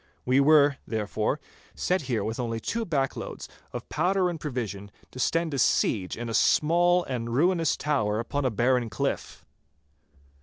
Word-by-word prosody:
We 130 Hz, +2 st, +3 dB
were, 145 Hz, -1 st, +5 dB
therefore, 110 Hz, -, -1 dB, 0.4 s
set 185 Hz, +1 st, 0 dB
here 120 Hz, -3 st, 0 dB
with 110 Hz, +2 st, -4 dB
only 115 Hz, -2 st, -2 dB
two 230 Hz, -, -3 dB
backloads 135 Hz, -5 st, -3 dB, 0.2 s
of -, -, -7 dB
powder 180 Hz, +3 st, +1 dB
and 165 Hz, -, -6 dB
provisions 110 Hz, -, -4 dB, 0.2 s
to 130 Hz, -, -10 dB
stand 165 Hz, +3 st, 0 dB
a 140 Hz, -, -1 dB
siege 95 Hz, -7 st, +1 dB
in 120 Hz, +1 st, -5 dB
a 115 Hz, -, -4 dB
small 175 Hz, +7 st, +3 dB
and 120 Hz, -5 st, -4 dB
ruinous 165 Hz, +1 st, +2 dB
tower 115 Hz, -8 st, 0 dB
upon 140 Hz, +5 st, -2 dB
a 130 Hz, -, +2 dB
barren 120 Hz, +1 st, +1 dB
cliff. -, -, -3 dB
135 Hz, 155 wpm, -27 LUFS, 115-160 Hz, 0.4 s, were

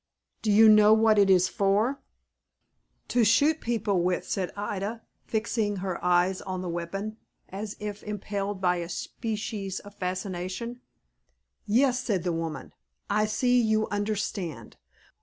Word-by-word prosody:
"Do 215 Hz, -, +1 dB
you 220 Hz, +2 st, +7 dB
know 215 Hz, 0 st, +7 dB
what 220 Hz, -1 st, +4 dB
it 200 Hz, -1 st, +5 dB
is 185 Hz, -1 st, +5 dB
for?" 210 Hz, +8 st, +1 dB, 1.1 s
"To 245 Hz, -, +3 dB
shoot 295 Hz, +9 st, +3 dB
people 210 Hz, -5 st, 0 dB
with," 180 Hz, +1 st, -1 dB
said 185 Hz, -2 st, -2 dB
Ida, 205 Hz, +2 st, -4 dB, 0.2 s
fixing 220 Hz, -1 st, -1 dB
her 185 Hz, -2 st, -4 dB
eyes 180 Hz, +1 st, +2 dB
on 185 Hz, -1 st, -4 dB
the 180 Hz, -, -4 dB
weapon, 195 Hz, +6 st, -4 dB, 0.3 s
as 200 Hz, +2 st, -6 dB
if 210 Hz, -1 st, -5 dB
impelled 205 Hz, -1 st, -4 dB
by 180 Hz, -1 st, +2 dB
a 170 Hz, -1 st, -5 dB
species 210 Hz, -3 st, -4 dB
of 205 Hz, 0 st, -13 dB
fascination. 185 Hz, +5 st, -4 dB, 0.9 s
"Yes," 250 Hz, +4 st, +3 dB
said 205 Hz, -9 st, -1 dB
the 175 Hz, -2 st, -1 dB
woman; 165 Hz, -1 st, -5 dB, 0.4 s
"I 215 Hz, +1 st, +2 dB
see 245 Hz, +3 st, +2 dB
you 220 Hz, -1 st, +1 dB
understand. 205 Hz, -, -3 dB
205 Hz, 140 wpm, -27 LUFS, 185-220 Hz, 1.1 s, you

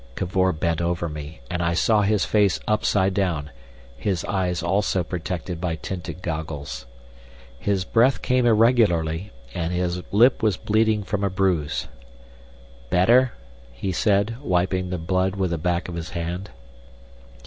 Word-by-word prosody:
Cavor 95 Hz, 0 st, +1 dB
bent 85 Hz, 0 st, -1 dB
over 85 Hz, 0 st, -1 dB
me, 75 Hz, 0 st, -8 dB
and 90 Hz, -1 st, -3 dB
I 85 Hz, 0 st, +1 dB
saw 105 Hz, +4 st, +3 dB
his 105 Hz, -1 st, +2 dB
face 105 Hz, -3 st, +2 dB
upside 100 Hz, -2 st, +2 dB
down, 85 Hz, -7 st, -1 dB, 0.4 s
his 95 Hz, +3 st, -2 dB
eyes 90 Hz, -3 st, -1 dB
also 95 Hz, 0 st, +1 dB
protected 90 Hz, 0 st, -4 dB
by 85 Hz, -3 st, -1 dB
tinted 90 Hz, 0 st, -6 dB
goggles. 75 Hz, -6 st, -5 dB, 0.7 s
His 95 Hz, +4 st, 0 dB
breath 120 Hz, +6 st, +3 dB
came 125 Hz, -1 st, +2 dB
irregularly, 105 Hz, -7 st, +3 dB, 0.2 s
and 85 Hz, 0 st, -2 dB
his 90 Hz, 0 st, -1 dB
lip 120 Hz, +6 st, +5 dB
was 105 Hz, -4 st, +2 dB
bleeding 110 Hz, 0 st, +1 dB
from 100 Hz, 0 st, -2 dB
a 100 Hz, -, +2 dB
bruise. 90 Hz, -5 st, 0 dB, 1.0 s
"Better?" 120 Hz, -, +4 dB, 0.4 s
he -, -, -3 dB
said, 100 Hz, +4 st, +1 dB
wiping 90 Hz, -4 st, 0 dB
the 90 Hz, -, -2 dB
blood 95 Hz, +3 st, 0 dB
with 95 Hz, -3 st, -1 dB
the 85 Hz, -, -1 dB
back 85 Hz, +1 st, -1 dB
of 90 Hz, -, -6 dB
his 80 Hz, -2 st, -5 dB
hand. 85 Hz, +3 st, -4 dB
90 Hz, 145 wpm, -24 LUFS, 85-100 Hz, 1.0 s, lip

